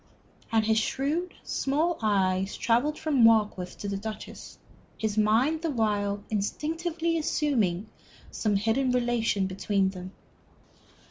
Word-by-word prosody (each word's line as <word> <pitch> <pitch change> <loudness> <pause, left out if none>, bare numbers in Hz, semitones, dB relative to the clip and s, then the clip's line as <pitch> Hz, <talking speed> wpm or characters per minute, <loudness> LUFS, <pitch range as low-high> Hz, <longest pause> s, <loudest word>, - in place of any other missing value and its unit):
And 220 -1 +2
his 220 0 +3
shrewd, 295 +10 -2
small 310 +5 0
eyes 195 -2 +1
travelled 260 +7 +1
from 290 -6 +2
Warkworth 210 -5 +3
to 205 - -5
the 200 -1 -2
Duchess, 215 +1 -8 0.4
his 215 -2 -2
mind 230 +9 +2
the 330 - -1
while 205 -5 0
instinctively 330 - -1
assuming 225 - 0 0.4
some 210 -2 0
hidden 225 +6 +1
relation 240 -5 +1
between 195 +1 0
them. 185 -1 -8
220 Hz, 120 wpm, -27 LUFS, 205-285 Hz, 0.4 s, his